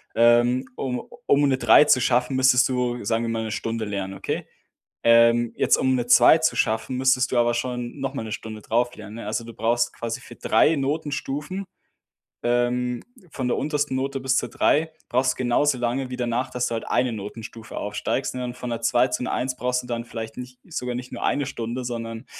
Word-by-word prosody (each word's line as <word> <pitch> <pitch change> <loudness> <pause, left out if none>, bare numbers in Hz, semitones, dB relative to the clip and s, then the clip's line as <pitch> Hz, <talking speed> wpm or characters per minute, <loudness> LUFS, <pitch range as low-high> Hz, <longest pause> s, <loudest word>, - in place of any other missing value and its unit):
Ähm, 120 +2 +4
um 125 -2 -3 0.3
um 145 0 +4
'ne 135 -1 +2
3 120 +4 +6
zu 130 -3 +4
schaffen, 125 +2 +1
müsstest 130 -1 +5
du, 125 -2 -1
sagen 115 +2 0
wir 115 - -2
mal, 115 0 -2
'ne 110 - -4
Stunde 115 +1 -3
lernen, 100 -2 -4
okay? - - -4 0.6
Ähm, 115 0 +5
jetzt, - - +3
um 130 0 +2
'ne 120 -1 -2
2 140 +5 +7
zu 160 0 +1
schaffen, 110 +3 0
müsstest 130 0 +2
du 125 - +1
aber 120 0 +3
schon 125 +2 -4
noch 135 0 -3
mal 135 - -3
'ne 110 - -7
Stunde 110 -1 -6
drauf 120 +2 0
lernen, 110 0 -10
ne? 115 - -7
Also, 110 +3 -2
du 115 0 -10
brauchst 120 +3 +1
quasi 115 -1 -5
für - - -13
3 160 - +3
Notenstufen, 150 +4 -3 0.8
ähm, 120 0 0 0.3
von 125 -2 -3
der - - +1
untersten 150 -3 -1
Note 135 0 -2
bis 130 0 +1
zur - - 0
3, 160 +2 +1 0.2
brauchst 125 +1 +2
du - - -21
genauso 130 +2 +2
lange 125 +2 -1
wie 125 - -4
danach, 125 +1 -1
dass 125 -1 -1
du - - -3
halt 115 - -4
eine 125 0 +1
Notenstufe 110 +2 -8
aufsteigst, 105 +6 -2
ne? 125 0 -4
Und 120 0 -6
von 125 - -5
'ner 115 -1 -3
2 120 +2 +3
zu 125 - -2
'ner - - -2
1 125 0 -2
brauchst 125 0 -1
du - - -11
dann 120 -1 -3
vielleicht 110 -1 -7
nicht 125 0 -8
sogar 125 -4 -3
nicht 125 0 -6
nur - - -7
eine 145 - +1
Stunde, 125 -1 -4
sondern, 115 0 -5
125 Hz, 215 wpm, -24 LUFS, 115-130 Hz, 0.8 s, 2